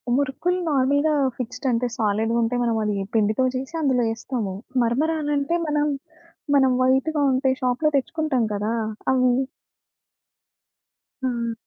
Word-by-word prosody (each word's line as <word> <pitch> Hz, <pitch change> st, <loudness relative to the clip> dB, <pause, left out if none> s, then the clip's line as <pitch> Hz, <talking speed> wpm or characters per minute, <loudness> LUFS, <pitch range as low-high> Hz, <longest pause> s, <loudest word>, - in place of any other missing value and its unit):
మురుకులు 285 Hz, +7 st, 0 dB
నార్మల్‌గా 285 Hz, +2 st, +2 dB, 0.2 s
ఫిక్స్‌డ్‌ 250 Hz, +2 st, -4 dB
అంటే 240 Hz, +1 st, +1 dB
సాలిడ్‌గుంటా‌‌‌‌యి. 230 Hz, +2 st, 0 dB
మనం 230 Hz, -1 st, +1 dB
అది 210 Hz, -1 st, 0 dB, 0.2 s
పిండితో 215 Hz, +3 st, +2 dB
చేసి 265 Hz, +5 st, -5 dB
అందులో 260 Hz, -5 st, +2 dB
ఏస్తాము. 225 Hz, -3 st, -4 dB, 0.3 s
మరమరాలంటే 295 Hz, +4 st, 0 dB
మనం 295 Hz, 0 st, +1 dB, 0.7 s
మనం 265 Hz, -2 st, +5 dB
వైట్‌గా 275 Hz, +4 st, +2 dB
ఉం‌టా‌యి. 260 Hz, 0 st, +1 dB
షాప్‌లో 255 Hz, +5 st, +1 dB
తెచ్చుకుంటాం 275 Hz, -3 st, 0 dB
కదా! 210 Hz, +3 st, -1 dB, 0.4 s
అవి. 255 Hz, -1 st, +3 dB, 1.9 s
హా! 235 Hz, -3 st, -1 dB
255 Hz, 110 wpm, -23 LUFS, 235-285 Hz, 1.9 s, మనం